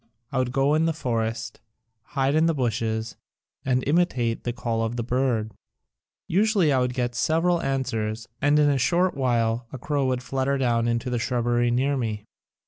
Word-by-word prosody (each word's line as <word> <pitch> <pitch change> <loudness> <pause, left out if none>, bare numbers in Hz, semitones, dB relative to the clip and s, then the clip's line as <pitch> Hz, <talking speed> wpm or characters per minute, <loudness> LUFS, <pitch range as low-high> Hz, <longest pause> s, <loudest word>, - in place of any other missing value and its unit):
I 130 - 0
would 125 -1 0
go 135 +2 +2
in 155 +1 +3
the 165 - +1
forest, 115 -6 -3 0.6
hide 135 +1 +2
in 160 +2 +3
the 165 - +1
bushes, 115 -3 -2 0.5
and 130 -1 +1
imitate 140 -8 +1
the 120 - 0
call 115 -2 -2
of 115 +1 -2
the 120 - -2
bird. 120 -3 0 0.8
Usually 195 -4 +3
I 130 - +3
would 125 -1 -1
get 120 -1 -1
several 165 +7 +1
answers 115 -6 -2
and 145 +1 +4
in 145 -1 +4
a 140 - +1
short 175 +7 +2
while 120 -2 0
a - - -6
crow 140 +1 -1
would 125 -1 -1
flutter 135 +1 -1
down 120 -3 +1
into 120 +2 -1
the 120 - 0
shrubbery 120 0 +1
near 135 +4 +1
me. 110 -4 -3
125 Hz, 180 wpm, -25 LUFS, 115-140 Hz, 0.8 s, and